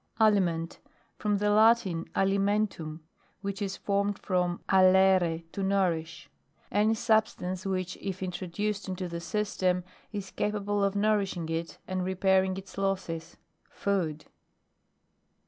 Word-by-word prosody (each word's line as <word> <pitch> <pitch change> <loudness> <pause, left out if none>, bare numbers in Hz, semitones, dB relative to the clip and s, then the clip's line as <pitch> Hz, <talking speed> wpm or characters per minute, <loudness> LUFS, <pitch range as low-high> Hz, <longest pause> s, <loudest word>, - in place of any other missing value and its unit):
ALIMENT. 180 -6 +2 0.4
From 210 -1 +1
the 210 +1 +1
Latin, 215 -5 +4
alimen 200 +2 +2
tam, 155 -3 -8 0.4
which 200 0 -4
is 195 -1 -2
formed 200 0 0
from 180 -2 0
oitre, 185 -3 +4
to 200 - -4
nourish. 175 -5 0 0.4
Any 215 +2 +3
substance, 210 -5 0
which, 185 -2 -2
if 190 -1 -5
introduced 190 +3 -3
into 185 -1 -3
the 170 -1 -5
system, 185 -1 0 0.3
i 205 - -3
capable 205 +1 -1
of 200 0 +1
nourishing 200 -5 +1
it 165 +1 -3
and 185 -1 -2
re 190 +1 -2
pairing 190 0 +3
its 195 0 -8
losses. 175 -4 -2 0.3
Food. 165 -7 -1
190 Hz, 125 wpm, -29 LUFS, 180-205 Hz, 0.4 s, Latin